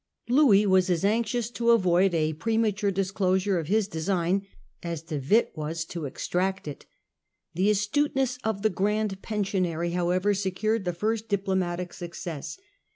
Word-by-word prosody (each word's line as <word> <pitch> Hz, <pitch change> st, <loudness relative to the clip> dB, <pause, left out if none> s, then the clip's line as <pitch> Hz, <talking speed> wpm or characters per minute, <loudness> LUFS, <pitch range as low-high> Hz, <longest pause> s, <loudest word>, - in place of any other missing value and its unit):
Louis 240 Hz, -6 st, +5 dB
was 190 Hz, -1 st, +3 dB
as 180 Hz, +1 st, +1 dB
anxious 230 Hz, +2 st, 0 dB
to 235 Hz, -1 st, 0 dB
avoid 185 Hz, -4 st, +4 dB
a 155 Hz, -1 st, +1 dB
premature 215 Hz, +3 st, 0 dB
disclosure 190 Hz, 0 st, 0 dB
of 160 Hz, -, -5 dB
his 210 Hz, +2 st, +2 dB
design 185 Hz, +2 st, -1 dB, 0.3 s
as 170 Hz, -2 st, -5 dB
De 155 Hz, -3 st, -4 dB
Witt 200 Hz, -, +2 dB
was 160 Hz, +1 st, -3 dB
to 170 Hz, -2 st, -6 dB
extract 185 Hz, +7 st, -2 dB
it. 145 Hz, -, -8 dB, 0.7 s
The 185 Hz, +5 st, +2 dB
astuteness 255 Hz, +5 st, +1 dB
of 215 Hz, -2 st, -2 dB
the 220 Hz, -, +3 dB
Grand 205 Hz, +1 st, -1 dB
Pensionary 185 Hz, -5 st, -1 dB
however 180 Hz, +3 st, +1 dB
secured 200 Hz, +2 st, -1 dB
the 175 Hz, -, -1 dB
first 220 Hz, +5 st, -2 dB
diplo 195 Hz, -1 st, 0 dB
matic 180 Hz, -1 st, -2 dB
success. 170 Hz, -, -6 dB
190 Hz, 150 wpm, -27 LUFS, 175-215 Hz, 0.7 s, Louis